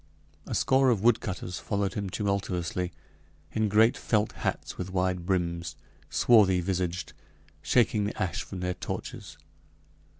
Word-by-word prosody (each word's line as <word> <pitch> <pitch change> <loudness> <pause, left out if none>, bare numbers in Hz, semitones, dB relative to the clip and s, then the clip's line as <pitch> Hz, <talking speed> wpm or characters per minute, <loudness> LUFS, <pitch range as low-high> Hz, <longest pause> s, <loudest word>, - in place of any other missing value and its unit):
A - - -3
score 130 0 +4
of 110 -5 +1
woodcutters 100 -6 +1
followed 100 -2 -1
him 100 -2 -3
tumultuously, 90 -3 -2 0.6
in 110 -1 0
great 110 +3 +5
felt 105 -1 0
hats - - -3
with 90 0 -5
wide 90 -1 -1
brims 85 -4 -1 0.3
swarthy 100 -6 +5
visaged 90 -2 -2 0.5
shaking 110 -4 +2
the 105 - -4
ash 90 -2 -1
from 95 -2 -7
their 90 0 -1
torches. - - -6
95 Hz, 130 wpm, -28 LUFS, 90-105 Hz, 0.6 s, great